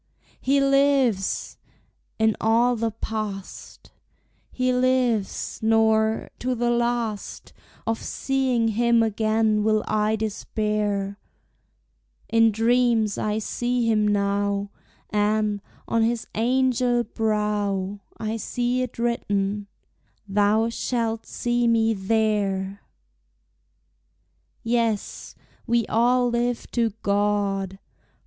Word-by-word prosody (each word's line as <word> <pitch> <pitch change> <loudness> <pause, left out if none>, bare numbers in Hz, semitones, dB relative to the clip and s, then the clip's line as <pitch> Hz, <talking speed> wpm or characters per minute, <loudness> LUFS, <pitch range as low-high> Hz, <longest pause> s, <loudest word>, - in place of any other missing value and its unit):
He 275 +1 +2
lives! 275 -7 +2 0.6
In 220 -1 +2
all 235 +3 +3
the 230 0 -1
past 215 -3 -6 0.6
He 255 0 0
lives; 250 -5 0
nor, 220 0 +2
to 255 0 -1
the 240 0 0
last, 235 -3 -2 0.3
Of 225 0 -1
seeing 260 -4 0
him 235 +1 +3
again 215 0 +1
will 215 0 +2
I 215 0 +1
despair; 210 -2 -2 1.1
In 225 0 +5
dreams 225 -1 +2
I 210 0 -1
see 240 +2 -1
him 215 -2 +2
now; 200 0 0 0.4
And, 210 0 +1 0.3
on 230 - +1
his 230 +1 0
angel 245 +1 +2
brow, 210 -3 -1 0.2
I 220 +1 -3
see 245 +3 -1
it 250 -2 -4
written, 205 -4 -1 0.6
"Thou 210 +3 +2
shalt 230 -1 -2
see 240 0 0
me 225 -1 +3
there!" 200 -2 0 1.8
Yes, 230 -3 -1 0.3
we 235 -1 +2
all 245 +2 +2
live 240 0 -1
to 230 -2 +1
God! 200 -1 0
220 Hz, 95 wpm, -24 LUFS, 210-240 Hz, 1.8 s, In